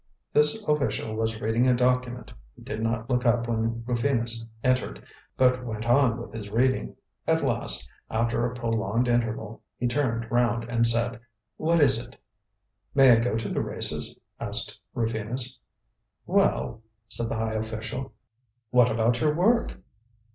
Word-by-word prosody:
This 150 +9 +7
official 115 -7 0
was 110 0 -2
reading 115 +3 +1
a 125 - +4
document. 125 0 0 0.2
He - - -15
did 110 - -5
not 115 0 -1
look 125 -1 0
up 120 -1 +2
when 115 0 -1
Rufinus 120 -2 -1 0.2
entered, 130 0 0 0.3
but 125 -1 +3
went 110 -2 -5
on 120 -1 +3
with 120 - -9
his 105 -2 -7
reading. 130 +5 0 0.3
At - - +2
last, - - 0 0.2
after 115 +1 0
a 120 +1 -2
prolonged 115 0 -1
interval, 115 -2 -1 0.2
he 125 - -1
turned 115 -3 -1
round 120 -1 +1
and 115 0 +1
said: 115 +1 0 0.4
"What 165 +2 +2
is 130 -5 +4
it?" - - -16 0.8
"May 135 -2 +7
I 115 - +7
go 115 -1 0
to 115 -2 -3
the - - -1
races?" - - -2 0.2
asked - - -3 0.2
Rufinus. 115 +3 -2 0.7
"Well," 65 - +1 0.3
said 115 +1 -4
the - - -2
high 110 0 -2
official, 110 +4 -4 0.6
"what 125 -1 +5
about 115 +2 +1
your 150 -1 +2
work?" 230 +8 +1
115 Hz, 150 wpm, -26 LUFS, 115-125 Hz, 0.8 s, This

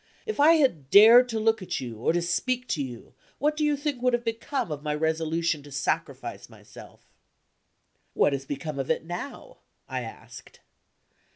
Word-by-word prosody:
If 435 -8 -4
I 305 +3 +7
had 255 - +1
dared 230 - +8
to 225 -2 -2
look 225 0 +1
at 180 -1 -3
you, 120 -3 -7
or 120 - +1
to 175 +1 0
speak 250 +8 -1
to 150 - -1
you, 125 -2 -9 0.2
what 300 +2 0
do 305 - -1
you 295 -1 +2
think 285 -3 -3
would 250 0 +2
have 240 0 0
become 230 - -3
of 145 -1 -4
my 150 0 -2
resolution 160 0 -1
to 145 0 -14
sacrifice 135 - -3
myself?" - - -15 1.1
"What 145 - +3
has 135 0 -4
become 145 0 -5
of 135 - -3
it - - 0
now?" 275 - -8 0.3
I - - -3
asked. - - -12
185 Hz, 180 wpm, -26 LUFS, -, 1.1 s, dared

